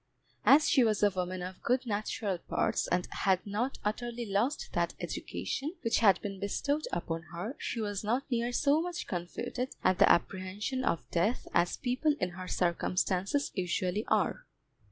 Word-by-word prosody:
As 300 +3 +7
she 265 - +5
was 215 -3 +2
a 205 - +5
woman 185 -1 -3
of 185 0 -7
good 255 +2 +1
natural 205 -3 -2
parts, - - 0
and 180 0 0
had 190 -2 +1
not 215 +6 -2
utterly 240 +2 -2
lost 215 +8 0
that - - 0
education 305 +6 -4
which 230 - +2
had 195 -5 +5
been 195 -2 -4
bestowed 285 +9 -1
upon 165 -1 -2
her, 210 +11 -4
she 235 - -3
was 205 -2 -2
not 240 +6 +1
near 240 0 +1
so 285 +5 +3
much 350 0 -4
confuted 235 +8 -4
at 185 - +3
the - - +7
apprehensions 195 +9 0
of 165 - 0
death 205 +9 +1
as 175 +1 +2
people 265 +5 +1
in 180 - 0
her 185 +1 -8
circumstances 185 +8 0
usually 185 +2 -1
are. - - +1
210 Hz, 165 wpm, -31 LUFS, 185-250 Hz, -, As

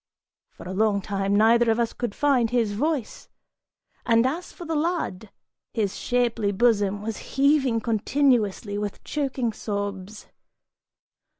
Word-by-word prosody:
For - - -14
a 185 - -5
long 210 0 +2
time, 195 0 -1
neither 230 +2 +4
of 225 +1 +2
us 235 -1 0
could 240 -5 -4
find 270 -6 +2
his 230 -4 +1
voice, 280 +1 -2 0.7
and 230 0 +3
as 320 +7 -2
for 345 - -10
the 325 - -3
lad, 300 - -2 0.5
his 210 -4 -1
shapely 235 -4 0
bosom 205 -2 +1
was 220 -1 -4 0.2
heaving 275 -4 +3
continuously 225 -3 +1
with 205 -1 -5
choking 265 -6 -2
sobs. 205 -1 -5
225 Hz, 130 wpm, -25 LUFS, 205-260 Hz, 0.7 s, neither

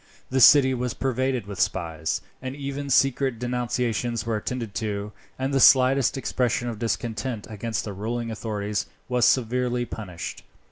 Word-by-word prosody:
The 130 0 +2
city 130 +1 +8
was 125 -1 -2
pervaded 130 -2 -1
with 100 -1 -7
spies, 80 -3 -1 0.2
and 130 +1 -5
even 140 0 -5
secret 135 -1 +2
denunciations 120 -1 -1
were 115 -1 -1
attended 115 0 -4
to, 105 -1 -3 0.3
and 135 +1 -2
the 135 - +3
slightest 130 0 +5
expression 125 -2 0
of 110 -3 -6
discontent 115 0 -2
against 110 +1 -3
the 105 - -5
ruling 115 +4 -3
authorities 105 -2 -3 0.2
was 125 -1 +2
severely 125 0 +1
punished. 90 -8 -7
120 Hz, 145 wpm, -25 LUFS, 110-130 Hz, 0.3 s, city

